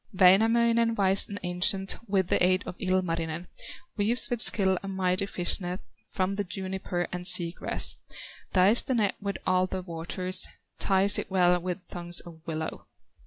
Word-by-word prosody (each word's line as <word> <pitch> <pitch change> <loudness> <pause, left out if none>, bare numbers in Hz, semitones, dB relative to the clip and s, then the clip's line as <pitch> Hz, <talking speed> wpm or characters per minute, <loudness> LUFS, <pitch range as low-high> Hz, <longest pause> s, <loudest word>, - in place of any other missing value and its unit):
'" - - -38
Wainamoinen, 230 +4 +3
wise 195 -1 +3
and 200 0 -6
ancient, 180 +2 +1
With 190 -3 0
the - - +1
aid 185 +1 +2
of - - -7
Ilmarinen, 170 -3 -2 0.5
Weaves 230 +6 +1
with 240 -2 +1
skill 190 -4 +4
a 195 - -8
mighty 190 0 -2
fish 175 -3 +2
net 180 +1 -5 0.3
From 190 +1 -2
the 205 - -1
juniper 185 -1 -5
and 180 0 -2
sea 175 -2 +5
grass; - - -1 0.5
Dyes 195 +5 +5
the 260 - -3
net 210 -4 +1
with 200 0 -4
alder 185 0 -1
water, 175 +1 -6 0.5
Ties 195 +1 +3
it - - -6
well 180 -2 +2
with 180 +1 -5
thongs 175 -1 0
of 165 -2 -13
willow. 160 -1 -6
185 Hz, 165 wpm, -27 LUFS, 180-200 Hz, 0.5 s, sea